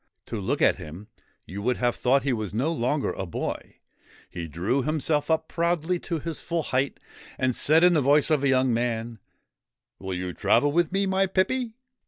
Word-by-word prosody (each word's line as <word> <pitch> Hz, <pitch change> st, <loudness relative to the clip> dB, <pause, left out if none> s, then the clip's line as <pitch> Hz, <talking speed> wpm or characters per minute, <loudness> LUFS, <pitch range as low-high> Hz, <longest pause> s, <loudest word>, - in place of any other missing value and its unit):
To 110 Hz, -, -5 dB
look 95 Hz, -, -1 dB
at -, -, +4 dB
him, 90 Hz, +8 st, -10 dB, 0.4 s
you 95 Hz, +5 st, -7 dB
would 125 Hz, +4 st, 0 dB
have 120 Hz, -1 st, +1 dB
thought 135 Hz, +2 st, +2 dB
he 135 Hz, -2 st, +1 dB
was 105 Hz, -3 st, -4 dB
no 135 Hz, +8 st, +1 dB
longer 145 Hz, -1 st, 0 dB
a 95 Hz, -, -5 dB
boy. 85 Hz, -, -5 dB, 0.6 s
He 85 Hz, -2 st, -5 dB
drew 95 Hz, -, -1 dB
himself 150 Hz, +1 st, -1 dB
up 160 Hz, 0 st, +1 dB
proudly 170 Hz, +1 st, 0 dB
to 170 Hz, -1 st, -3 dB
his 160 Hz, +1 st, -5 dB
full 170 Hz, -1 st, -2 dB
height, 135 Hz, +1 st, -1 dB, 0.4 s
and 130 Hz, -1 st, 0 dB
said 160 Hz, +3 st, +4 dB
in 180 Hz, 0 st, +6 dB
the 155 Hz, -, +3 dB
voice 145 Hz, +3 st, +3 dB
of 150 Hz, -3 st, +3 dB
a 140 Hz, -, +3 dB
young 130 Hz, -1 st, +3 dB
man: 115 Hz, -1 st, -2 dB, 0.8 s
1 95 Hz, -, -9 dB
Will 95 Hz, -, -2 dB
you 90 Hz, 0 st, -4 dB
travel 135 Hz, +11 st, +2 dB
with 170 Hz, +2 st, +1 dB
me, 195 Hz, +1 st, +1 dB
my 190 Hz, 0 st, +1 dB
pippy 225 Hz, +5 st, 0 dB
140 Hz, 200 wpm, -26 LUFS, 115-165 Hz, 0.8 s, in